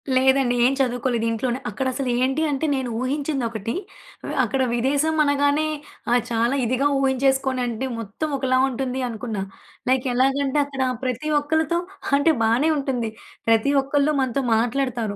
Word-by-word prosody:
లేదండి. 265 -1 +3
ఏం 260 - +3
చదువుకోలేదు. 245 -2 0
ఇంట్లోనే 240 +2 -1
అక్కడసలు 260 +4 -2
ఏంటి 270 +4 +1
అంటే 280 +2 -1
నేను 265 -2 -2
ఊహించిందొకటి. 255 -6 -2 0.7
అక్కడ 270 - 0
విదేశమనగానే 285 +3 +2 0.4
ఆహ్, 245 0 +4
చాలా 235 +3 +1
ఇదిగా 255 +4 +1
ఊహించేసుకొనంటే 265 -2 +1
మొత్తం 225 +8 -4
ఒకలా 260 -1 +1
ఉంటుందనుకున్నా. 245 -4 -3 0.5
లైక్ 260 0 +2
ఎలాగంటే 270 +3 +2
అక్కడ 275 -2 -5 0.2
ప్రతి 255 +4 -2
ఒక్కరితో 315 +3 0 0.4
అంటే 285 +3 +4
బానే 235 +8 +3
ఉంటుంది. 255 -5 -1 0.4
ప్రతి 225 +4 +3
ఒక్కళ్ళు 285 +2 +1
మనతో 260 +1 0
మాట్లాడతారు. 235 -2 -1
260 Hz, 120 wpm, -23 LUFS, 240-275 Hz, 0.7 s, ఆహ్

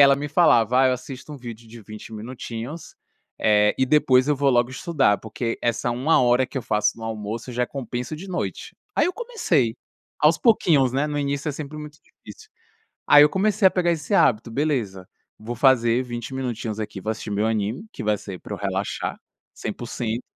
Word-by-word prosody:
ela 140 -1 +8
me 145 +1 -4
falava: 125 -6 +4
"Ah, - - +5
eu - - +2
assisto 130 +3 -7
um - - -7
vídeo 120 -3 -9
de 115 0 -12
20 105 +2 -10
minutinhos, 120 +6 -7 0.5
eh, 105 -1 +4
e 130 - +2
depois 130 -2 +3
eu 150 - +2
vou 140 +1 +2
logo 120 -1 +2
estudar, 135 - +1
porque 115 +1 -4
essa 120 +1 0
1 130 +7 +2
hora 125 +1 +3
que - - -11
eu 130 - -1
faço 105 0 0
no 115 - -11
almoço, 110 +2 -5
já 125 0 0
é - - -11
compenso 125 +1 -5
de 180 +6 -9
noite". 180 -1 -4 0.2
Aí - - +3
eu 360 - -1
comecei, 190 - 0 0.4
aos 150 +2 +4
pouquinhos, 155 - +3
né, 140 +3 0
no 145 - -2
início 140 +1 -2
é - - -1
sempre 150 +1 -7
muito 150 0 -9
difícil. - - -15 0.6
Aí 145 - +8
eu 150 - +7
comecei 195 +3 +3
a - - -12
pegar 175 -2 +1
esse 165 +4 -5
hábito: 115 - +3
"Beleza, 115 -9 -2 0.3
vou 115 +3 -6
fazer 120 -1 +3
20 120 0 -6
minutinhos 120 -4 -4
aqui, 105 -2 -5
vou 110 - -3
assistir 110 -1 -5
meu 105 +1 0
anime, 110 - -2
que - - -7
vai 105 -1 +1
ser 95 -2 -9
pra - - -7
eu - - -8
relaxar - - -3 0.4
100%, 115 +1 -4
125 Hz, 200 wpm, -23 LUFS, 115-150 Hz, 0.6 s, ela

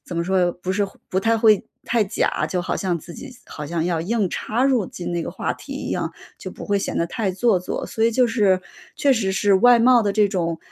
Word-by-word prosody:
怎 175 - -7
么 170 - 0
说， 185 -1 +2
不 180 +2 -4
是 200 +1 0 0.2
不 190 - +1
太 225 +2 +2
会 215 -3 +4 0.2
太 235 -2 +1
假， 200 +3 -1
就 180 -1 -2
好 - - -2
像 180 -3 -1
自 170 +3 -11
己 280 - -9 0.2
好 150 - -7
像 165 +1 -2
要 170 -2 0
硬 200 +1 -1
插 235 +4 -1
入 255 -8 +2
进 175 -1 -6
那 170 -1 -1
个 - - -5
话 - - -3
题 - - -10
一 - - -5
样， - - -2 0.3
就 - - -7
不 - - -9
会 200 0 +1
显 195 - -3
得 170 - +1
太 195 +3 -2
做 195 +1 +2
作， - - -4
所 220 - -3
以 230 - +4
就 250 +2 +3
是 205 -6 +2 0.4
确 280 -2 +3
实 220 -6 0
是 200 +1 +3
外 245 +5 +6
貌 240 0 +5
的 205 -2 0
这 210 -1 +3
种， 170 -4 -2
195 Hz, 270 characters per minute, -22 LUFS, 180-230 Hz, 0.4 s, 外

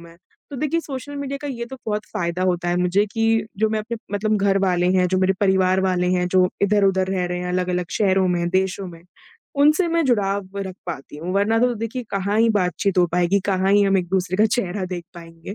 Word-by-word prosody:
मैं। 170 0 -15 0.3
तो 280 - -6
देखिए 305 +5 0
सोशल 285 -1 -7
मीडिया 280 0 -4
का 290 - -4
ये 235 -3 -4
तो 265 - -9
बहुत 210 0 -2
फ़ायदा 170 +1 -2
होता 175 -1 0
है 175 - +1
मुझे 180 +3 +2
कि 225 -1 +1
जो 220 0 +2
मैं 215 0 -1
अपने 235 +2 -5 0.2
मतलब 215 +1 +1
घर 195 -1 +2
वाले 180 -1 +1
हैं 180 0 +3
जो 185 +1 +1
मेरे 190 0 +3
परिवार 190 -1 +3
वाले 180 -1 +1
हैं 180 - 0
जो 185 0 +3
इधर-उधर 195 -2 +3
रह 185 -2 0
रहे 180 0 -3
हैं 180 0 -4
अलग-अलग 180 -1 -1
शहरों 190 -2 +2
में 175 -1 0
देशों 190 +1 0
में, 170 -1 -11 0.5
उनसे 305 +5 +4
मैं 335 -1 +1
जुड़ाव 200 -5 0
रख 190 -2 -4
पाती 150 -3 -7
हूँ 170 +4 -5
वरना 210 +3 +2
तो 245 0 +2
देखिए 230 +3 -4
कहाँ 200 +2 -1
ही 230 +1 +4
बातचीत 195 -1 0
हो 175 - +5
पाएगी, 180 +3 +2
कहाँ 190 0 +1
ही 205 - +5
हम 195 -1 +3
एक-दूसरे 185 0 -1
का 215 +1 +4
चेहरा 205 -5 -2
देख 175 -2 -6
पाएँगे। 165 +3 -10
190 Hz, 225 wpm, -22 LUFS, 180-220 Hz, 0.5 s, हो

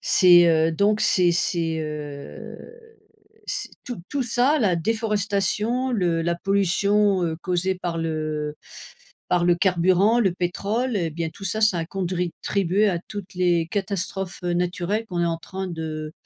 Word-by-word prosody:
c'est, 175 -2 +6
heu, 160 0 +3
donc, 210 +5 +2
c'est 180 -2 +4
c'est, 165 -2 0
heu, 150 -2 -7 0.9
c'est - - -1 0.2
tout 245 -3 -5
tout 280 -2 -1
ça 250 +6 +2
la 195 -6 +2
déforestation, 215 +4 0
le 175 -7 +1
la 170 +1 0
pollution, 200 +1 +2
heu, 160 -1 -2
causée 185 +1 0
par 175 -2 -4
le 155 -2 -3 0.7
par 180 -1 +2
le 175 - +5
carburant, 185 +5 +3
le 195 -6 +2
pétrole, 200 +3 -1
bien 165 +1 -4
tout 195 - -12
ça, 210 +3 -1
ça 205 -5 +4
a 165 - -3
contribué 185 +2 -1
à 175 - -1
toutes 205 -3 -7
les 175 -2 +2
catastrophes, 195 -1 -3
heu, 175 - 0
naturelles 180 +5 -1
qu'on 180 -4 -3
est 170 - +2
en 165 -1 -1
train 190 +3 -6
de 155 -2 -5
180 Hz, 150 wpm, -23 LUFS, 170-205 Hz, 0.9 s, c'est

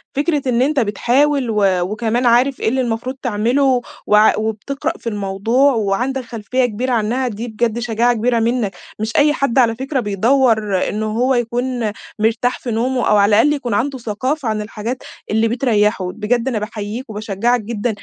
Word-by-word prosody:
فكرة 295 +1 +1
إن 240 0 +2
أنتَ 285 +2 +2
بتحاول 255 +5 +1
و 210 -2 +1 0.2
وكمان 220 +6 -1
عارف 245 +3 +3
إيه - - +1
اللي 260 +3 0
المفروض 240 +2 -3
تعمله، 250 +3 +1 0.3
وعـا- 210 0 +5
وبتقرأ 275 +9 -3
في - - -10
الموضوع 210 +7 +1
وعندك 235 +5 -1
خلفية 240 +2 -1
كبيرة 245 +3 -2
عنها، 240 +3 0
دي 230 +1 -5
بجد 230 0 -1
شجاعة 240 0 +1
كبيرة 235 +1 +1
مِنَّك، 230 -3 0 0.2
مش 220 +1 -3
أي 295 +1 +4
حد 275 -3 +1
على 230 -3 +3
فكرة 265 +3 -2
بيدوّر 220 -2 +1
إنه 215 +1 -2
هو 240 +5 +1
يكون 240 -1 -1 0.3
مرتاح 225 +3 +1
في 245 - -5
نومه، 250 +3 0
أو 210 - +4
على 200 0 +4
الأقل 295 +3 +3
يكون 255 -6 -3
عنده 265 +6 0
ثقافة 255 +5 -3
عن 215 -1 -1
الحاجات 220 +4 -5 0.3
اللي 220 +1 +2
بتريحه، 215 -6 +1
بجد 230 +5 -1
أنا 240 -5 0
بأحيّيَك 215 +3 -6
وباشجّعك 220 +3 -1
جدًا 225 +2 -3
235 Hz, 170 wpm, -18 LUFS, 215-255 Hz, 0.3 s, وعـا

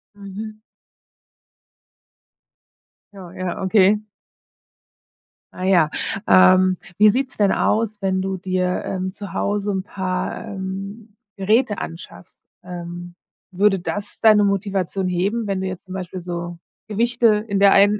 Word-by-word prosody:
Mhm. 205 +2 -8 2.6
Ja, 185 -4 -11
ja, 185 +1 -4
okay. 210 +2 +3 1.5
Ah 185 - -7
ja. 175 -5 +4 0.4
Ähm, 185 0 +6 0.2
wie 210 0 +7
sieht's 260 +4 -1
denn 200 -2 +3
aus, 215 -1 0
wenn 190 -1 0
du 190 0 -2
dir, 185 0 -1
ähm, 185 0 -3
zu 200 0 -9
Hause 205 0 -1
'n 190 -1 -2
paar, 185 +2 -3
ähm, 200 +2 -7 0.2
Geräte 215 +2 +2
anschaffst? 170 +2 -9 0.2
Ähm, 175 0 -8 0.4
würde 195 +1 +2
das 205 +3 -5
deine 215 -2 +6
Motivation 195 -1 -1
heben, 200 +5 -1
wenn 195 -1 -1
du 190 - -2
jetzt 185 0 -7
zum 185 - -9
Beispiel 185 -1 -6
so 175 -1 -5 0.3
Gewichte 235 +2 +2 0.2
in 200 -1 0
der 200 -1 +6
einen 205 +1 +5
195 Hz, 125 wpm, -21 LUFS, 185-205 Hz, 2.6 s, wie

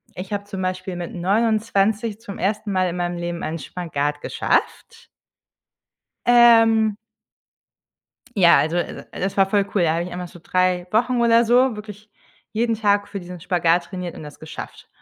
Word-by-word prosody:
ich 190 +3 -6
habe 200 0 -2
zum 200 -2 -6
Beispiel 185 0 -3
mit 175 -1 -6
29 215 +2 0
zum 205 -4 -9
1. 210 +2 -1
Mal 185 -1 +1
in 175 - -5
meinem 175 0 -2
Leben 175 0 -4
einen 160 +2 -3
Spagat 145 -2 -3
geschafft. 460 - -2 1.2
Ähm. 225 -3 +5 1.4
Ja, 175 -3 +7
also, 155 +5 +1
äh, 175 - -4
äh, - - -9
das 195 +2 -2
war 195 - +5
voll 200 0 +1
cool, 190 - +3
da 160 -2 +2
habe 170 +1 -1
ich 180 - -7
einmal 180 0 -5
so 175 - -14
3 185 0 0
Wochen 240 +2 +2
oder 235 0 +4
so 245 +1 +3
wirklich 210 0 -10 0.4
jeden 230 +1 0
Tag 205 -1 +1
für 200 - -6
diesen 180 0 -9
Spagat 175 0 +1
trainiert 180 -3 -6
und - - -9
das 150 -1 -11
geschafft. 155 - -9
195 Hz, 170 wpm, -22 LUFS, 175-220 Hz, 1.4 s, Ja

